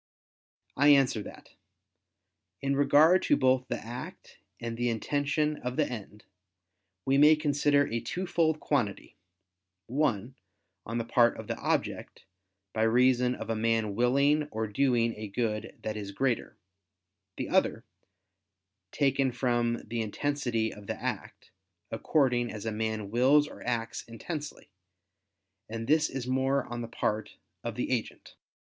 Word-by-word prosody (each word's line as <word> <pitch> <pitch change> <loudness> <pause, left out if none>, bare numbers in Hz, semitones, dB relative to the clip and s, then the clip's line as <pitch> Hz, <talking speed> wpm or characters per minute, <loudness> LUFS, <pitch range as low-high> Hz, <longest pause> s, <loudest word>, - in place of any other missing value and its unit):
I 145 - +4
answer 135 -6 +5
that, - - -12 1.1
In 140 0 0
regard 155 +6 +5
to - - +3
both 130 0 +2
the - - -2
act, 120 +2 -9 0.2
and 115 0 -4
the 120 +1 0
intention 145 +5 0
of 125 0 -4
the 150 - +2
end, 105 -3 -8 0.8
we 135 +1 +3
may 150 +2 +8
consider 145 -1 +2
a 115 - -2
twofold 160 +2 0
quantity: 120 -9 -2 0.7
one, 125 -3 -1 0.5
on 115 +2 -3
the 115 - -2
part 120 0 +3
of - - -7
the - - -3
object, - - -2 0.5
by 110 - -1
reason 125 +2 +3
of - - -5
a - - 0
man 110 -1 +1
willing 140 +6 +2
or 110 0 -2
doing 115 +1 +1
a 110 0 -5
good 110 0 -3
that 110 - -3
is 105 -2 -5
greater; 125 +3 -1 0.8
the - - -3
other, - - +1 1.1
taken 135 -2 +1
from 120 -1 0
the 115 0 -3
intensity 115 -1 -1
of 105 -1 -13
the - - -4
act, - - -5 0.4
according 120 0 +1
as 110 0 -7
a 115 - -1
man 110 -2 -3
wills 135 +5 +4
or - - -12
acts 115 -2 -3
intensely; 145 - -7 1.0
and 115 +1 -4
this 155 +4 +3
is 130 -2 -4
more 130 +2 +1
on 120 0 -5
the 115 - -5
part 110 -1 -2 0.3
of - - -4
the - - -2
agent. - - -3
125 Hz, 140 wpm, -29 LUFS, 115-140 Hz, 1.1 s, may